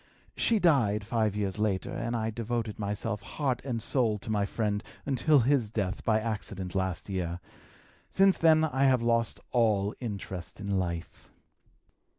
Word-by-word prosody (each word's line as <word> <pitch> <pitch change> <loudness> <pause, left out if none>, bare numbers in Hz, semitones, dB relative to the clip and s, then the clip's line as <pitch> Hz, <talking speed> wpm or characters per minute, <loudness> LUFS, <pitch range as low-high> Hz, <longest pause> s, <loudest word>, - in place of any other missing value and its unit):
She 230 - +2
died 120 - +3
five 110 -2 0
years 100 -1 -2
later, 100 -3 0
and 115 +1 -3
I 110 -1 -1
devoted 115 -1 -3
myself 105 +1 -2
heart 130 +3 -2
and 125 -4 -2
soul 115 -3 +1
to 110 - -6
my 100 -2 +1
friend 105 -1 -1 0.2
until 140 +1 +3
his 125 -3 +2
death 100 -3 -2
by 110 -1 +3
accident 100 -4 -4
last 95 -2 -2
year. 90 -3 -3 0.7
Since 195 -2 +4
then 160 -1 +5
I 140 -3 +2
have 130 -3 +3
lost 115 -1 +1
all 105 -4 +2
interest 100 -7 -6
in 100 -1 -1
life." 85 -2 -5
110 Hz, 155 wpm, -29 LUFS, 100-125 Hz, 0.7 s, then